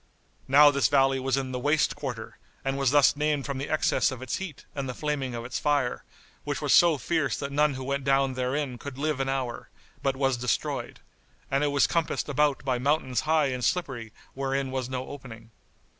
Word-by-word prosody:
Now 145 +2 +7
this 140 0 +2
valley 135 -1 +3
was 135 0 0
in 130 -1 -2
the 125 - -3
"Waste 150 +4 +2
Quarter[FN#71]" - - -6 0.3
and 135 0 -1
was 135 -2 +3
thus 145 +1 +5
named 150 -1 0
from 140 -2 -3
the 140 - -4
excess 155 0 +2
of 130 -2 -7
its 130 - -2
heat 190 -7 -7
and 135 -2 -4
the 125 - -5
flaming 140 -5 -2
of 115 0 -5
its 125 - -3
fire, 145 -4 0 0.4
which - - -3
was - - +1
so 170 -3 +6
fierce 145 -1 0
that 140 0 -4
none 150 0 +2
who 130 - -6
went 140 +1 -2
down 135 0 +2
therein 130 0 -2
could 140 -2 -8
live 150 -1 -1
an 135 0 -1
hour, 130 -3 -3 0.3
but 135 -1 0
was 135 -2 +1
destroyed; 125 0 -2 0.5
and 135 +2 +2
it - - +3
was 140 -1 +3
compassed 165 -2 -1
about 145 -1 +1
by 130 -2 0
mountains 130 -3 +1
high 155 -3 +3
and 125 -1 -4
slippery 130 -11 -1 0.2
wherein 135 0 -2
was 130 -1 -3
no 130 0 -3
opening. 115 -5 -10
135 Hz, 205 wpm, -27 LUFS, 130-145 Hz, 0.5 s, Now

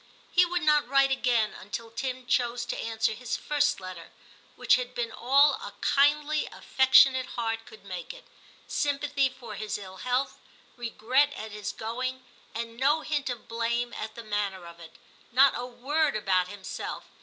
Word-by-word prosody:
He 355 0 +5
would 355 -1 -1
not 300 -3 +4
write 275 +1 +4
again 240 -4 +1
until 225 +4 -7
Tim 255 +1 -4
chose 240 -1 0
to - - -3
answer 225 -1 -1
his 240 +2 -4
first 290 -1 +1
letter, 185 -3 -9 0.5
which - - +3
had 250 -1 +1
been 235 -1 -2
all 280 +5 +4
a - - -7
kindly 295 +2 +2
affectionate 260 0 +5
heart 225 -1 -2
could 220 - -14
make 180 -3 -6
it, - - -14 0.4
sympathy 285 -1 0
for 245 -4 -10
his 215 +1 -3
ill 190 -2 -10
health, 250 +5 -1 0.4
regret 245 +4 +1
at 220 0 -7
his 210 -1 -4
going, 255 +3 -4 0.3
and 230 0 -5
no 290 +5 +3
hint 295 -2 -2
of 245 -2 -6
blame 235 +1 -1
at 220 0 -6
the 235 - -8
manner 205 -4 -2
of 170 0 -12
it, 165 -1 -13 0.4
not 265 +3 +6
a 245 - -4
word 280 +4 0
about 185 -3 +1
himself. 195 0 -6
245 Hz, 165 wpm, -28 LUFS, 220-275 Hz, 0.5 s, not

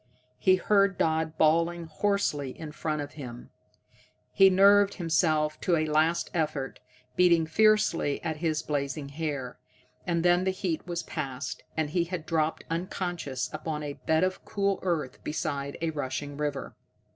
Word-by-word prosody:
He 185 - +5
heard 200 0 +2
Dodd 160 0 0
bawling 170 +2 +2
hoarsely 155 -5 -1
in 155 -2 -6
front 150 -1 -2
of 145 - -9
him, 125 -5 -9 0.8
he 195 0 +6
nerved 200 +1 +5
himself 155 -3 +1
to 175 - +2
a 155 -1 +1
last 155 +2 +1
effort, 150 -5 -2 0.4
beating 170 -2 +4
fiercely 210 -4 +3
at 160 -2 -2
his 155 -1 -1
blazing 140 -1 -3
hair 140 -4 -4 0.5
and 170 -1 0
then 175 +1 +4
the 190 - +1
heat 185 -3 -3
was 170 -1 -3
past, 135 -6 -5 0.2
and 155 -2 0
he 170 +1 +1
had 170 -2 -5
dropped 160 -1 0
unconscious 165 -6 -3
upon 155 0 -4
a 145 -1 -4
bed 160 +3 +1
of 185 0 -1
cool 200 -1 0
earth 165 -8 -2
beside 140 -3 -3
a 165 - +1
rushing 145 -1 -4
river. 145 -1 -3
160 Hz, 150 wpm, -28 LUFS, 150-175 Hz, 0.8 s, he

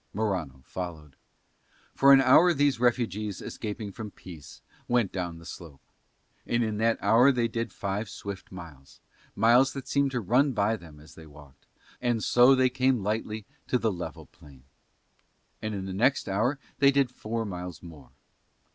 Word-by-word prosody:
Morano 90 -12 -3
followed. 80 -6 -7 0.8
For 140 0 +5
an 135 -1 +8
hour 160 +7 +5
these 140 -3 +2
refugees 110 -5 0
escaping 105 -1 -6
from 110 +1 -7
peace 85 -7 -13 0.2
went 120 -5 +1
down 90 -3 -4
the 85 - -14
slope; 80 -5 -11 0.6
and 120 0 +1
in 110 -2 -2
that 115 +1 +2
hour 125 +5 +5
they 120 -3 0
did 115 0 -4
five 100 +1 -4
swift 100 0 -8
miles, 80 -7 -12 0.4
miles 120 +5 +4
that 135 -2 -7
seemed 140 -1 +1
to 130 -2 -2
run 125 +7 +2
by 110 0 +1
them 80 -7 -13
as 75 +1 -16
they 80 -1 -13
walked, 70 -2 -17 0.3
and 120 -3 0
so 125 +2 +5
they 130 0 +3
came 130 -3 +1
lightly 110 0 -3 0.2
to 125 - +2
the 115 -2 0
level 90 -2 -7
plain. 70 -3 -18 1.0
And 110 -1 -3
in 95 -1 -5
the 95 - -5
next 125 +8 +1
hour 110 +8 0 0.2
they 140 - +6
did 140 -2 +2
four 115 -2 -4
miles 90 -4 -7
more. 75 -7 -13
110 Hz, 165 wpm, -27 LUFS, 90-125 Hz, 1.0 s, an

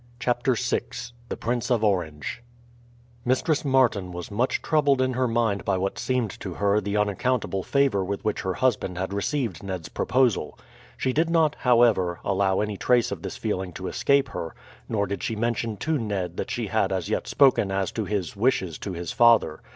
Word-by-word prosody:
CHAPTER 120 +1 +1
VI - - 0 0.5
THE - - -4
PRINCE 120 +1 -2
OF 120 -3 +2
ORANGE 85 -4 -1 0.8
Mistress 140 +5 +1
Martin 125 -9 +2
was 90 +2 -7
much 120 +6 0
troubled 145 -4 +3
in 130 0 +1
her 130 +1 +1
mind 115 -4 0
by 95 -2 +1
what 95 +1 -2
seemed 125 -5 0
to 95 -4 -6
her 100 +1 +2
the 100 +1 -2
unaccountable 105 0 0
favour 135 -3 +2
with 100 +2 -4
which 105 - 0
her 95 -1 -2
husband 110 -8 0
had 95 +2 -3
received 105 - -2
Ned's 95 -4 -5
proposal. 120 - +1 0.4
She 130 - 0
did 160 +4 +2
not, 160 -3 +3
however, 115 -8 +3
allow 95 0 +1
any 105 -1 -2
trace 125 +1 +2
of - - -4
this - - -6
feeling 95 -1 -3
to 95 +2 -6
escape 140 0 +2
her, 80 - -6 0.3
nor 100 -2 +1
did 100 0 -4
she 115 -4 -2
mention 115 -1 -1
to 155 +4 -1
Ned 100 -6 -3
that - - -3
she - - -2
had - - 0
as - - -2
yet - - -2
spoken 130 -8 +4
as 95 -1 -1
to 110 - -3
his 100 -4 -2
wishes 100 -7 0
to 100 - -5
his 85 0 -4
father. 115 -9 +4
105 Hz, 190 wpm, -25 LUFS, 95-125 Hz, 0.8 s, spoken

